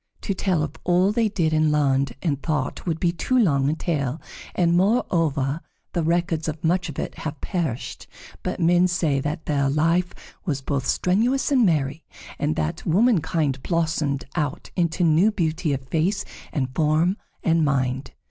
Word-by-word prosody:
To 200 - -1
tell 185 -4 0
of 155 +1 -5
all 180 +2 +3
they 225 0 +1
did 170 -6 0
and 155 -1 +3
learned 140 -3 +2
and 145 -5 0
thought 150 +1 -2
would 165 -2 -1
be 175 - +2
too 255 +9 0
long 140 - +3
a 155 - 0
tale, 150 -4 -2 0.4
and, 170 -1 +3
moreover, 165 - +1 0.3
the 175 - 0
records 165 -1 0
of 155 +1 -4
much 175 +1 +1
of 150 - -8
it - - -4
have 155 -2 -5
perished, 160 - -3 0.3
but - - -3
men 175 +2 +4
say 165 -6 +1
that 150 +4 -3
their 140 -2 +1
life 165 +5 +2 0.3
was 150 -8 -1
both 135 -1 -2
strenuous 235 +11 +1
and 250 -6 +5
merry, 150 -1 0 0.4
and 75 - 0
that 75 0 -2
womankind 165 - +2
blossomed 155 -4 -1
out 145 -2 -2
into 175 0 +1
new 170 +6 +4
beauty 165 -4 -1
of 135 -1 -3
face 175 +6 0 0.3
and 130 -3 -2
form 160 +5 +2 0.3
and 165 -1 +3
mind. 130 -2 0
160 Hz, 165 wpm, -24 LUFS, 145-180 Hz, 0.4 s, and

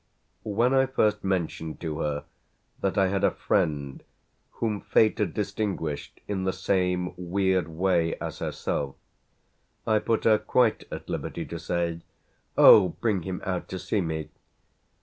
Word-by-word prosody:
When 120 +5 +2
I 135 0 +4
first 105 -5 +1
mentioned 85 -4 -2
to 80 -3 -3
her 75 -1 -2 0.6
that 95 - -1
I 95 -1 +4
had 100 0 -1
a - - +6
friend 70 -3 -1 0.5
whom 105 -3 -2
fate 105 +1 +3
had 105 -6 +1
distinguished 100 -7 -3
in 95 -2 -2
the 95 - +1
same 90 -1 0
weird 95 -1 0
way 85 0 +1
as - - -6
herself 70 -1 -3 0.9
I 110 -1 +3
put 115 +1 0
her 110 -1 +5
quite 120 -4 +2
at - - -7
liberty - - -4
to 85 - -6
say 85 0 -2 0.6
"Oh, 95 -4 +9
bring 105 -5 +1
him 90 +1 -5
out 90 -2 -2
to 95 - -5
see 100 +3 -1
me!" 80 -2 -3
95 Hz, 150 wpm, -27 LUFS, 85-105 Hz, 0.9 s, Oh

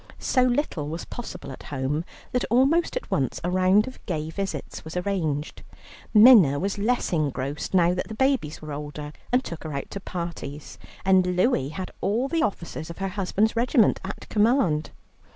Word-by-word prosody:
So 255 - +1
little 245 - 0
was 165 +2 -5
possible 235 - -7
at 130 - -10
home 145 +3 -1 0.3
that 250 - 0
almost 275 - +3
at - - -7
once 135 -2 0
a 175 - -1
round 185 +3 +4
of 255 - -10
gay 155 -3 -2
visits 195 +3 -5
was 160 +2 -6
arranged. 165 -6 -2 0.5
Minna 215 - +8
was 195 +6 -2
less 235 -1 0
engrossed 145 +1 -2
now 175 -1 +4
that 180 - -3
the 220 - -7
babies 260 - 0
were 150 -1 -6
older, 150 0 -6 0.2
and 250 +1 +3
took 170 -8 -7
her 155 -2 -5
out 140 - -5
to 200 - -4
parties; 170 -6 -6 0.3
and 185 -1 +4
Louie 180 - +2
had 185 +4 -6
all 220 +8 +1
the 325 +3 0
officers 170 - -3
of 170 - -8
her 195 0 -2
husband's 200 +3 0
regiment 235 -1 +3
at 190 +2 -7
command. 210 - +2
185 Hz, 175 wpm, -25 LUFS, 155-225 Hz, 0.5 s, Minna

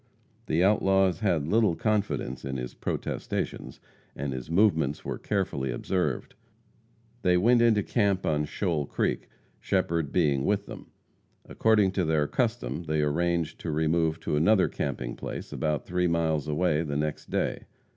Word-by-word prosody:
The 85 +3 +2
outlaws 95 -3 +3
had 85 -8 +1
little 105 -2 +3
confidence 105 - -1
in 65 0 -3
his 60 -1 -5
protestations, - - -4 0.4
and 70 0 -3
his 65 +2 -6
movements 80 -6 +2
were - - -4
carefully 95 -10 -1
observed. 75 +3 -2 0.9
They 90 -3 +3
went 120 +6 +4
into 110 -3 +4
camp 100 -5 +1
on 75 -1 +1
Shoal 80 -3 -2
Creek, - - -2 0.3
Shepherd 80 -4 0
being 75 -6 +2
with 100 +3 0
them. - - -10 0.6
According 105 -4 +3
to 95 -1 0
their 80 -2 +2
custom 115 - -2
they 75 -1 0
arranged 85 +2 0
to 85 - -5
remove 80 +1 +1
to - - -1
another 95 +6 +4
camping 65 -3 -4
place - - -6
about 75 -2 -1
three 90 0 0
miles 80 -3 0
away 75 0 +1
the 75 -3 -2
next 75 0 -3
day. - - -1
85 Hz, 145 wpm, -27 LUFS, 75-95 Hz, 0.9 s, went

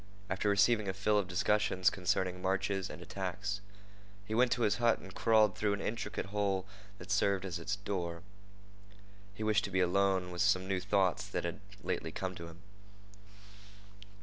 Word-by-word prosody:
After 95 +2 +1
receiving 100 +1 +3
a - - -1
fill 105 +2 +2
of 100 - -2
discussions 95 0 +2
concerning 95 -2 -1
marches 95 0 0
and - - -8
attacks, 100 +2 -3 0.6
he 110 - -5
went 120 +2 +4
to 120 - -1
his 105 -1 +2
hut 120 -2 +3
and 95 0 -12
crawled 110 -2 +4
through 105 -1 +1
an 100 - -2
intricate 105 0 -3
hole 100 -1 -1 0.3
that 95 +1 -9
served 100 -1 +2
it - - -3
as 85 -1 -3
a 100 +4 -2
door. 85 -4 -3 1.1
He 110 - -5
wished 110 -1 +2
to - - -4
be 95 - 0
alone 95 0 +2
with 90 -1 -3
some 95 -2 +3
new 95 -1 0
thoughts 95 -1 +1
that - - -3
had - - -3 0.2
lately - - -2
come 95 -1 -3
to 85 -2 -8
him. 85 +1 -13
100 Hz, 175 wpm, -33 LUFS, 95-105 Hz, 1.1 s, went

